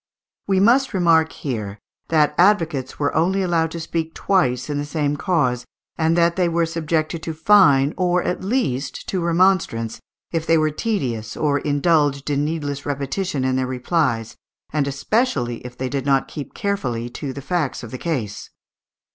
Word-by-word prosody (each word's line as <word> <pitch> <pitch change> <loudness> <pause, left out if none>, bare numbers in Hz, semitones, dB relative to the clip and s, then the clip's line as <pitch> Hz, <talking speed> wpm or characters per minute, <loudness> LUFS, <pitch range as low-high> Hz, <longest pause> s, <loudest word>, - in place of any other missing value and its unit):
We 195 -1 +2
must 240 +4 +3
remark 165 -3 +4
here 105 -7 -5 0.3
that 155 -2 +3
advocates 165 -8 +2
were 145 -1 0
only 185 +5 +2
allowed 165 -2 +1
to 170 - -6
speak 165 0 -3
twice 125 -11 +1
in 145 -1 -2
the - - -2
same 145 -1 -1
cause, 145 -8 0 0.3
and 165 +1 +1
that 170 +1 +3
they 180 -2 +2
were 170 0 +1
subjected 160 0 -2
to 160 0 -5
fine, 155 -6 +5
or 180 -1 +1
at 180 - -2
least 170 - -2
to 185 - -1
remonstrance, 170 - +1 0.3
if 165 -1 -2
they 165 - +5
were 155 -1 +2
tedious 130 - -2
or 145 -2 +1
indulged 145 -1 +1
in 145 0 +1
needless 145 -2 -3
repetition 145 +2 -2
in 130 0 +1
their 130 -1 0
replies, 125 -3 -1 0.4
and 150 -2 +1
especially 140 - 0
if 125 0 -9
they 130 - -2
did 135 0 -3
not 135 -1 +2
keep 145 - -8
carefully 130 - -2
to 135 +3 -5
the 140 - -7
facts 165 -6 -2
of 115 - -8
the 130 - -6
case. 120 -12 -3
155 Hz, 170 wpm, -21 LUFS, 135-170 Hz, 0.4 s, fine